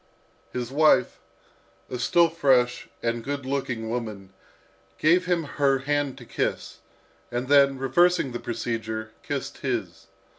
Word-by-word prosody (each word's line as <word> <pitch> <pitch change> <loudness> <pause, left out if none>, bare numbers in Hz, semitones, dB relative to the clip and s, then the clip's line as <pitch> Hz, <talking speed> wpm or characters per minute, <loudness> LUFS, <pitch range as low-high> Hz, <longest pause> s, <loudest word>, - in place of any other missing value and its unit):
His 125 0 -4
wife, 155 +2 +3 0.7
a 125 - -5
still 170 +7 +4
fresh 130 -6 +2
and 115 0 -1
good 140 0 -4
looking 130 -4 -2
woman, 110 -5 -5 0.6
first - - -36
gave 175 +4 +3
him 175 -2 +1
her 140 -2 +1
hand 145 0 -1
to - - -11
kiss, - - -3 0.5
and 120 +1 -2
then, 140 -1 +5
reversing 155 +3 +2
the 120 - -4
procedure, 110 -1 -4
kissed 140 0 -5
his. 115 -10 -4
130 Hz, 135 wpm, -25 LUFS, 120-145 Hz, 0.7 s, then